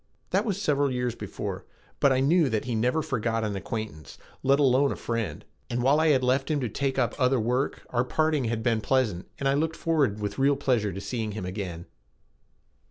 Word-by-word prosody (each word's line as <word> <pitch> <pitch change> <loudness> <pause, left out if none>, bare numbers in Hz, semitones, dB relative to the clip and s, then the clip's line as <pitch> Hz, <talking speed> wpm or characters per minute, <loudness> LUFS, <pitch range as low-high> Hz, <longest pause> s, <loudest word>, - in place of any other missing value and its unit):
That 195 +4 +2
was 200 -4 -1
several 145 -6 +2
years 125 -1 -1
before - - -5 0.4
but 140 - +4
I 130 0 +2
knew 155 +1 +4
that 110 -3 -1
he 125 - -2
never 125 +8 +1
forgot 115 -5 -1
an 105 -2 -2
acquaintance, 95 - -6 0.2
let 135 +1 +3
alone 140 0 +4
a - - -2
friend, 115 -2 -3 0.2
and 120 0 -1
while 140 +4 +4
I 160 - +3
had 135 -4 +4
left 130 +3 +1
him 150 -2 +1
to 125 - -1
take 135 +4 -2
up 125 -3 +1
other 125 0 +3
work 125 +5 -1
our 120 0 +2
parting 155 +1 +1
had 110 0 -2
been 115 -2 +1
pleasant, 110 -8 0
and 140 - -1
I 135 - +3
looked 160 +3 0
forward 145 -13 +1
with 105 +1 -4
real 140 +1 +4
pleasure 120 -7 +1
to 95 - -6
seeing 110 0 -3
him 100 -3 -5
again. 90 -3 -5
125 Hz, 210 wpm, -27 LUFS, 110-140 Hz, 0.4 s, but